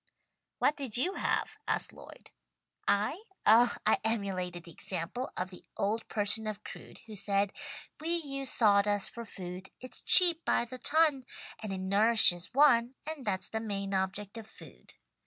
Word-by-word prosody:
"What 295 - +2
did 260 -6 -1
you 355 +10 +1
have?" - - -2
asked - - -1
Lloyd. - - -14 0.6
"I? 210 - +1 0.2
Oh 235 +3 +6
I 215 - +3
emulated 185 -6 -2
the 170 - -12
example 185 +10 -4
of 185 +1 -3
'The 180 - -12
old 215 +3 -1
person 215 +1 0
of 215 0 -5
Crewd' - - -11
who 220 -2 -10
said 200 0 0 0.5
"'We 315 - -6
use 275 -5 -3
sawdust 205 -2 +3
for 235 0 -8
food. 185 -2 -8
It's 255 - -7
cheap 345 -3 +6
by - - +1
the 255 +2 -9
ton 290 -3 +2 0.3
And 215 -2 -5
it 190 - -3
nourishes 195 -2 +4
one, 255 -3 +4
And 310 -4 -6
that's 190 -2 +1
the 220 - -3
main 200 -2 -3
object 195 +3 -2
of 220 - -11
food.' 220 - -15
215 Hz, 160 wpm, -31 LUFS, 195-255 Hz, 0.6 s, Oh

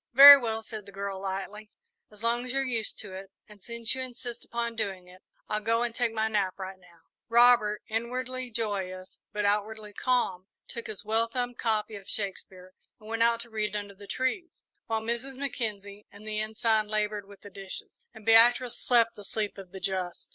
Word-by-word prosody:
"Very 280 +3 +13
well," 225 -4 -2
said 215 -2 -8
the - - -10
girl, 195 -1 -4
lightly; 195 +2 -5 0.4
"as 210 +1 -10
long 235 +1 +1
as 250 - -5
you're 270 +1 0
used 230 -4 -1
to 205 -3 -9
it, 190 +1 -8 0.2
and 210 -2 -16
since 235 +2 -3
you 260 - -3
insist 245 -2 -6
upon 235 0 -3
doing 195 -5 -3
it, 185 +1 -16 0.3
I'll 210 - 0
go 230 +2 +2
and 240 -1 -2
take 240 -1 0
my 220 0 0
nap 205 -4 0
right 190 -1 -7
now." 175 -2 -21 0.3
Robert, 235 -3 +5
inwardly 255 +3 -3
joyous, 195 -5 -4
but 210 0 -1
outwardly 210 +1 -1
calm, 195 -6 0 0.2
took 235 - -6
his 210 -2 -7
well 225 +2 +1
thumbed 245 0 -3
copy 220 -2 0
of 195 - -13
Shakespeare 185 -2 -5 0.3
and 215 0 -13
went 225 0 -2
out 230 0 +4
to 235 - -9
read 210 -1 -2
under 205 -1 -4
the 200 +1 -13
trees, 260 - -2 0.2
while 225 -1 0
Mrs. 235 +4 -3
Mackenzie 210 -7 -5
and 210 +1 -13
the 215 0 -2
Ensign 220 0 +1
laboured 210 -1 -1
with 200 -1 -15
the 205 - -12
dishes, 195 0 -6
and 215 - -14
Beatrice 240 +2 +5
slept 230 -2 +4
the 205 - -11
sleep 210 -1 -3
of 185 -2 -11
the 195 - -8
just. 185 -2 -3
215 Hz, 200 wpm, -29 LUFS, 200-235 Hz, 0.4 s, Very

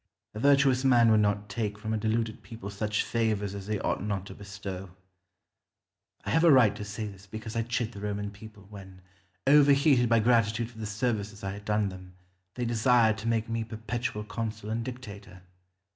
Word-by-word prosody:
A 105 - -6
virtuous 135 -1 +4
man 120 -4 +5
would 110 - +5
not 105 -1 +1
take 105 -3 -3
from 110 +1 -4
a - - +1
deluded 110 0 -1
people 100 -1 -8
such 105 +1 -1
favours 110 -4 -1
as 100 -1 -7
they 105 0 -1
ought - - -1
not 100 -2 -3
to - - -9
bestow. 100 -2 -7 1.4
I - - -2
have 160 - +3
a 170 - +7
right 120 -7 +6
to 105 - -6
say 105 +2 -5
this 100 -1 -10
because 110 +2 -7
I 115 - +1
chid 115 0 -2
the 100 - -10
Roman 105 0 -3
people, 105 -1 -13
when, 95 -2 -12 0.4
overheated 140 -3 +5
by 115 -1 +5
gratitude 115 0 +2
for 110 - -14
the 110 - -4
services 105 -2 -2
I 95 - -2
had 100 +1 -9
done 105 -1 +1
them, 95 -1 -11 0.4
they 125 - -2
desired 115 -1 +3
to 110 - -5
make 115 -1 0
me 115 0 -2
perpetual 110 0 -4
consul 110 -1 -5
and 115 +1 -1
dictator. 100 -7 -9
110 Hz, 190 wpm, -28 LUFS, 100-115 Hz, 1.4 s, a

